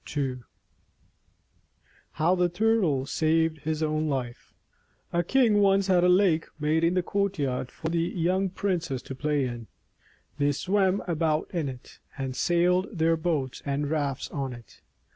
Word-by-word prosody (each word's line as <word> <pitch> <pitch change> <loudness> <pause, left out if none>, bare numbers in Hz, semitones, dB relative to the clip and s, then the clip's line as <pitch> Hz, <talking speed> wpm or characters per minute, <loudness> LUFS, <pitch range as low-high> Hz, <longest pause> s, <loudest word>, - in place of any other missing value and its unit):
II 130 -3 -1 1.7
HOW 165 +4 +2
THE 180 -1 +2
TURTLE 180 -8 +1
SAVED 160 +1 +1
HIS 155 +1 -2
OWN 155 0 0
LIFE 125 -4 -4 0.6
A 170 - +3
KING 225 +2 +3
once 195 -1 +4
had 185 -2 +3
a 180 - +5
lake 180 -3 +3
made 155 +2 +1
in 170 +2 +2
the 180 - +1
courtyard 150 -12 -1
for 160 - -6
the 170 0 0
young 180 +3 0
princes 175 -9 -2
to - - -7
play 145 0 0
in. 120 -2 -6 0.7
They 145 0 +2
swam 190 +5 +1
about 160 -2 0
in 160 -6 -1
it, 125 -1 -11 0.2
and 135 -2 -4
sailed 180 +4 +2
their 165 +1 +3
boats 155 -6 -2
and 140 +1 -2
rafts 145 -4 -2
on 135 -3 -3
it. 120 -1 -14
160 Hz, 150 wpm, -27 LUFS, 140-180 Hz, 1.7 s, a